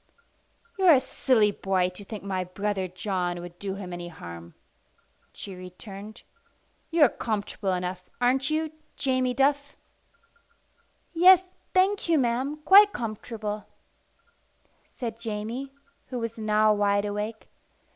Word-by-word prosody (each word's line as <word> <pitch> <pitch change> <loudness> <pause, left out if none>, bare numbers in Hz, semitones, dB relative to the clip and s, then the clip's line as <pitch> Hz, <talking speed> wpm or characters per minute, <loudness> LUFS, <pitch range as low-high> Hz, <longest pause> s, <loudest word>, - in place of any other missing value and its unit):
"You're 370 -3 +7
a 270 - +6
silly 250 -4 +2
boy 190 -2 0
to 185 +3 -10
think 210 0 -8
my 190 -2 -2
brother 190 +1 -2
John 180 -1 -2
would 175 0 -10
do 195 -1 -4
him 185 -3 -7
any 175 0 -6
harm," 85 - -10 0.8
she 195 - -8
returned. 195 +4 -10 0.7
"You're 325 -4 +6
comfortable 205 -4 -2
enough, 180 0 -4
aren't 260 +3 +2
you, 310 0 -1 0.2
Jamie 255 -2 0
Duff?" 285 +1 +1 1.4
"Yes, 365 +2 +7 0.3
thank 380 0 +2
you, 330 - +5
ma'am, 260 +3 0
quite 405 +1 +8
comfortable," 215 -2 -5 1.3
said 230 -2 -5
Jamie, 230 +4 -4 0.4
who 255 - -5
was 230 -1 -4
now 215 0 +3
wide 205 0 +2
awake. 210 +2 -4
215 Hz, 120 wpm, -27 LUFS, 190-260 Hz, 1.4 s, quite